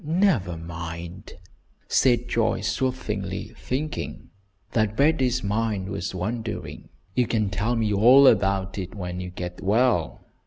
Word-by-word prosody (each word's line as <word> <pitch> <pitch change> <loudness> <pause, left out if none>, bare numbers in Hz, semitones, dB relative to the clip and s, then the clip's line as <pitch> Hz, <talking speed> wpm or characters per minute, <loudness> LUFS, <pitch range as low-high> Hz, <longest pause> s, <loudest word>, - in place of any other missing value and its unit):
never 155 - +1
mind!" 85 +1 -7 0.6
said 120 -2 +3
Joyce, 115 -2 0
soothingly, 105 -5 -3
thinking 145 +6 -4 0.4
that 110 -1 0
Betty's 135 -4 +2
mind 105 -2 -1
was 95 -1 -4
wandering. 110 +4 -4 0.2
"You 125 +1 +2
can 110 -4 0
tell 105 +4 0
me 110 -2 +1
all 125 +7 +7
about 95 -4 +3
it 95 +1 -6
when 90 -2 -5
you 90 0 -5
get 90 0 -7
well." 105 -4 +1
105 Hz, 125 wpm, -25 LUFS, 95-120 Hz, 0.6 s, all